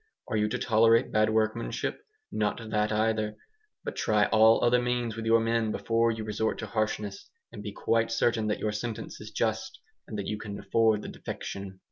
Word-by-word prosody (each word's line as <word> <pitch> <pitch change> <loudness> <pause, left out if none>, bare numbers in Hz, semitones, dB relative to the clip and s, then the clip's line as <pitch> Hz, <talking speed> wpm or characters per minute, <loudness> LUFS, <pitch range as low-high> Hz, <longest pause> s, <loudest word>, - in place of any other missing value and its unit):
Are 115 - -1
you 105 0 +2
to - - -1
tolerate 115 0 +4
bad 110 0 +3
workmanship? 110 - -1 0.3
Not 105 +1 0
that 105 0 +1
either. 110 0 0 0.5
But - - -4
try 105 -1 +2
all 110 +1 +5
other 120 +1 +4
means 120 -2 -1
with 115 0 -4
your 115 0 +5
men 115 -1 +1
before 115 +1 +1
you 110 -1 -2
resort 110 +1 -1
to - - -4
harshness; 105 -2 -3 0.2
and 105 - -8
be 105 0 -5
quite 115 +2 +1
certain 115 -1 +1
that 105 - 0
your 110 - -1
sentence 110 +1 -5
is - - -8
just, - - -2 0.3
and 110 - -5
that 100 - -3
you 105 - -3
can 105 -2 -6
afford 105 +1 +2
the - - -6
defection. 95 -1 -7
110 Hz, 190 wpm, -28 LUFS, 105-115 Hz, 0.5 s, all